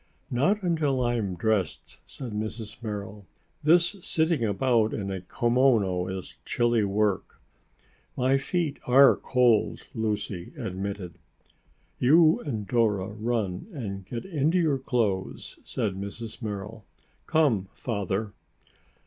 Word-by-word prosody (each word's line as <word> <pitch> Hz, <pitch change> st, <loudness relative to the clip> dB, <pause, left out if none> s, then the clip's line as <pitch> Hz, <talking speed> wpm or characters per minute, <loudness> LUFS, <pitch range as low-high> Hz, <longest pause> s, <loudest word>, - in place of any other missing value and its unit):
"Not 190 Hz, -, +2 dB
until 150 Hz, -7 st, +1 dB
I 120 Hz, 0 st, +1 dB
am 100 Hz, -5 st, -2 dB
dressed," 100 Hz, -5 st, -1 dB
said 125 Hz, -4 st, -7 dB
Mrs. 110 Hz, +1 st, -5 dB
Merrill. 105 Hz, -2 st, -6 dB, 0.3 s
"This 170 Hz, +5 st, +4 dB
sitting 160 Hz, -5 st, +2 dB
about 110 Hz, +1 st, +2 dB
in 100 Hz, -2 st, -3 dB
a 95 Hz, -1 st, -4 dB
kimono 110 Hz, -4 st, +2 dB
is 95 Hz, -1 st, -6 dB
chilly 120 Hz, -2 st, +1 dB
work." 100 Hz, -1 st, 0 dB, 0.8 s
"My 130 Hz, +1 st, +3 dB
feet 160 Hz, 0 st, -2 dB
are 135 Hz, +2 st, +7 dB
cold," 125 Hz, -4 st, +2 dB
Lucy 105 Hz, -6 st, -3 dB
admitted. 95 Hz, -2 st, -5 dB, 0.8 s
"You 155 Hz, +5 st, +5 dB
and 110 Hz, -9 st, -4 dB
Dora 110 Hz, -5 st, +1 dB
run 105 Hz, -, -2 dB
and 100 Hz, -9 st, -5 dB
get 115 Hz, +5 st, -6 dB
into 160 Hz, -1 st, +1 dB
your 155 Hz, -6 st, +2 dB
clothes," 110 Hz, -8 st, -2 dB
said 100 Hz, -, -2 dB
Mrs. 105 Hz, +5 st, -7 dB
Merrill. 105 Hz, 0 st, -5 dB, 0.4 s
"Come, 125 Hz, -12 st, +2 dB
Father." 100 Hz, -2 st, -3 dB
110 Hz, 115 wpm, -27 LUFS, 100-130 Hz, 0.8 s, are